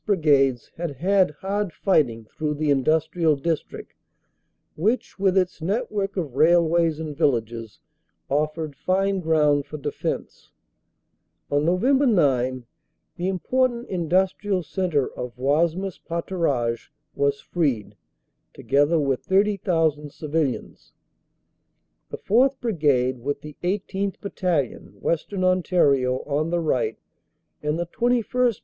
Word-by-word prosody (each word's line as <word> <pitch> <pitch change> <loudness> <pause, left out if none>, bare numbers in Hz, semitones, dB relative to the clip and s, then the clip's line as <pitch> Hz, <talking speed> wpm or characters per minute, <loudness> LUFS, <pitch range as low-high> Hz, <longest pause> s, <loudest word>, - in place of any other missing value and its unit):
Brigades 140 - +2
had 165 -4 -4
had 190 +6 +3
hard 195 +5 -3
fighting 135 - +1
through 150 +6 -3
the 150 0 0
industrial 155 +3 +2
district 160 +3 -4 0.8
which 215 +6 -1
with 195 -1 +2
its 180 -3 0
net 210 +9 -1
work 200 -1 -2
of 155 -8 -3
railways 165 +1 +3
and 155 -2 -5
villages 115 -7 -1 0.5
offered 150 +1 -1
fine 195 +3 0
ground 150 -4 +2
for 155 - -6
defense. 140 - -5 1.0
On 145 +1 +2
Nov. 180 +4 +1
9 145 - +2 0.5
the 175 - -2
important 240 +6 0
industrial 185 +2 0
centre 165 -5 0
of 125 0 -7
Wasmes 165 +8 0
Paturages 155 -9 -1 0.2
was 140 0 0
freed, 140 - -1 0.6
together 145 +4 +2
with 135 -3 0
30,000 175 -7 +1
civilians. 150 -4 -3 1.2
The - - -6
4th. 260 +5 +2
Brigade, 145 - +1
with 140 +4 -3
the 150 -1 -10
18th. 195 +1 -2
Battalion, 175 - -2
Western 185 - -1
Ontario, 145 -8 +2
on 150 +2 -1
the 175 0 0
right, 125 -8 0 0.6
and 150 +1 -1
the 175 - -1
21st. 240 +3 +1
160 Hz, 115 wpm, -24 LUFS, 140-190 Hz, 1.2 s, had